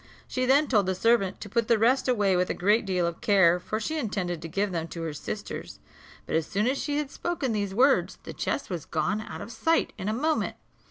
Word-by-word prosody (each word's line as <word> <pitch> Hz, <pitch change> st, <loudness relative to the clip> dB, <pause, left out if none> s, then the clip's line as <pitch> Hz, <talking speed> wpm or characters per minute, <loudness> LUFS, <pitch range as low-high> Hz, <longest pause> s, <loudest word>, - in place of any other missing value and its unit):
She 255 Hz, 0 st, -1 dB
then 280 Hz, +4 st, +5 dB
told 210 Hz, -7 st, +2 dB
the 190 Hz, -, 0 dB
servant 220 Hz, -1 st, +2 dB
to -, -, -6 dB
put 230 Hz, +2 st, 0 dB
the 230 Hz, -, +4 dB
rest 250 Hz, +6 st, +3 dB
away 205 Hz, -6 st, +2 dB
with 180 Hz, 0 st, +1 dB
a -, -, -1 dB
great 210 Hz, +3 st, +2 dB
deal 180 Hz, -2 st, +1 dB
of 170 Hz, 0 st, -4 dB
care, 180 Hz, -4 st, +4 dB
for 215 Hz, +4 st, -3 dB
she 315 Hz, +8 st, -2 dB
intended 185 Hz, -, -2 dB
to 165 Hz, -, -5 dB
give 195 Hz, +4 st, -1 dB
them 165 Hz, -2 st, -2 dB
to 165 Hz, 0 st, -6 dB
her 160 Hz, -2 st, -3 dB
sisters; 145 Hz, -, -6 dB, 0.5 s
but -, -, -2 dB
as 160 Hz, -1 st, +1 dB
soon 205 Hz, +2 st, 0 dB
as 265 Hz, +3 st, +1 dB
she 290 Hz, -1 st, -1 dB
had 295 Hz, -2 st, -2 dB
spoken 340 Hz, -8 st, -2 dB
these 200 Hz, -3 st, -2 dB
words 265 Hz, +4 st, +3 dB
the -, -, -7 dB
chest 280 Hz, -, -3 dB
was 170 Hz, -5 st, -4 dB
gone 180 Hz, +7 st, -1 dB
out -, -, -8 dB
of 230 Hz, -, -7 dB
sight 325 Hz, +8 st, +1 dB
in 195 Hz, -, -2 dB
a -, -, +1 dB
moment. 305 Hz, +6 st, 0 dB
210 Hz, 240 wpm, -27 LUFS, 180-255 Hz, 0.5 s, then